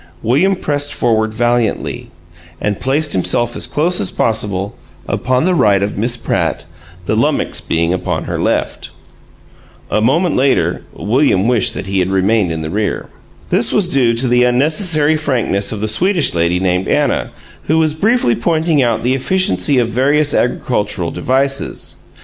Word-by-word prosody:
William 160 - +2
pressed 145 -4 -2
forward 110 -2 0
valiantly, 120 -1 -1 0.5
and 105 -1 -2
placed 145 +3 0
himself 120 +6 0
as - - +1
close 170 +4 +1
as 95 - +2
possible 100 -3 -1 0.3
upon 130 +4 0
the 185 - +2
right 105 - +2
of 100 - -3
Miss 120 +4 +1
Pratt, - - -2 0.4
the - - -1
lummox - - 0
being 85 +1 -1
upon 90 - -3
her - - -4
left. - - -2 1.0
A 110 - +1
moment 155 +9 +1
later, 135 +1 +1
William 115 -3 +1
wished 120 -4 +1
that - - -5
he 95 0 -2
had 90 0 0
remained 95 0 +1
in 80 -1 -4
the 80 - -5
rear. 105 +2 -3 0.4
This - - +3
was 200 -4 +2
due 125 -8 +2
to 125 +3 +2
the 125 0 +3
unnecessary 155 +5 +3
frankness 125 -10 -1
of 105 -2 -5
the 110 - -1
Swedish 175 - +2
lady 85 +1 0
named 90 0 -1
Anna, - - 0 0.4
who 160 - +1
was 160 -1 +1
briefly 215 - +1
pointing 160 +3 0
out 120 -2 0
the 125 +2 +1
efficiency 170 0 +1
of 120 -2 +1
various 145 +5 +1
agricultural 105 -8 -1
devices. 135 +8 -2
120 Hz, 160 wpm, -15 LUFS, 105-150 Hz, 1.0 s, This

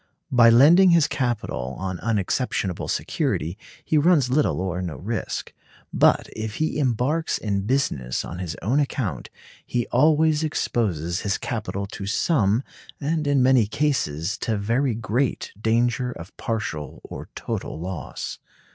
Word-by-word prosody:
By 120 -2 +7
lending 160 +11 +7
his 170 -3 +5
capital 120 - -2
on 95 -2 -4
unexceptionable 105 -3 -1
security 85 +4 -1 0.3
he 155 - +3
runs 145 -5 +3
little 145 -6 +2
or 90 -1 -2
no 85 -5 -4
risk. 110 +10 -4 0.4
But - - +4
if 110 -1 -4
he 155 -1 -1
embarks 140 +5 +1
in 100 -2 -2
business 75 - 0
on 90 - -7
his 90 -3 -4
own 125 +8 +2
account, 115 - -2 0.3
he 120 -2 -1
always 155 +3 +4
exposes 95 - -1
his 100 -1 0
capital 105 -4 -3
to 100 0 -7
some, 110 - +2 0.4
and 155 +1 -1
in 140 -2 +3
many 125 -4 +4
cases 105 - -1
to 110 -2 -1
very 115 +5 0
great, 115 +4 -1
danger 120 +3 +1
of 90 -4 -10
partial 75 - -4
or - - -8
total - - -4
loss. 90 0 -5
115 Hz, 140 wpm, -24 LUFS, 95-140 Hz, 0.4 s, By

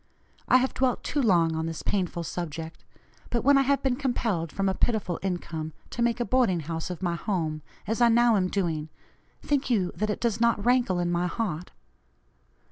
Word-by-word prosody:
I - - +6
have 260 +1 0
dwelt 255 -2 0
too 290 - 0
long 170 -8 +3
on 160 0 -2
this 165 -1 -5
painful 180 -3 -1
subject, 165 -1 -6 0.5
but 235 - -1
when 280 +2 +6
I 275 - +5
have 275 +1 +1
been 265 -2 +2
compelled 230 - -1
from 195 0 -1
a 190 - +2
pitiful 195 -4 0
income 165 -4 -4 0.2
to 240 - -4
make 235 0 +1
a 240 - 0
boarding 230 -10 +2
house 165 +3 -4
of 180 +1 -6
my 175 -2 +1
home, 165 -4 -2 0.2
as 225 +4 -2
I 240 - +6
now 235 0 +5
am 185 -2 +2
doing, 165 -5 -2 0.5
think 280 -2 0
you 195 -7 +1
that 215 0 -1
it 210 - -2
does 230 -2 -1
not 230 -3 +2
rankle 245 -6 +3
in 175 0 0
my 175 +1 +1
heart? 180 -3 -3
195 Hz, 200 wpm, -27 LUFS, 170-240 Hz, 0.5 s, I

